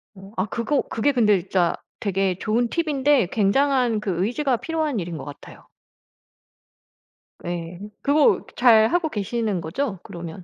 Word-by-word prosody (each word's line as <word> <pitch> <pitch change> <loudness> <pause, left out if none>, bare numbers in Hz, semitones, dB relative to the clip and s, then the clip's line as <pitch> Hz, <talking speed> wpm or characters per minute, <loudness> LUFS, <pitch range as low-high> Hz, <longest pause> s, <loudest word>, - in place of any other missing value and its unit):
어. 195 +1 -13
아 - - +1
그거 235 +6 -1
그게 255 +6 +1
근데 210 -6 +3
진짜 180 -1 0 0.2
되게 195 -3 0
좋은 230 +3 0
팁인데 290 - +2
굉장한 245 +2 +2
그 190 -3 -1
의지가 250 +2 0
필요한 305 -2 -2
일인 170 -2 -5
것 135 - -8
같아요. 145 0 -12 1.8
예. 175 0 -5 0.2
그거 290 +1 +3
잘하고 240 +7 +5
계시는 210 - -2
거죠, 195 - -3
그러면? 170 +1 -8
220 Hz, 270 characters per minute, -23 LUFS, 185-270 Hz, 1.8 s, 잘하고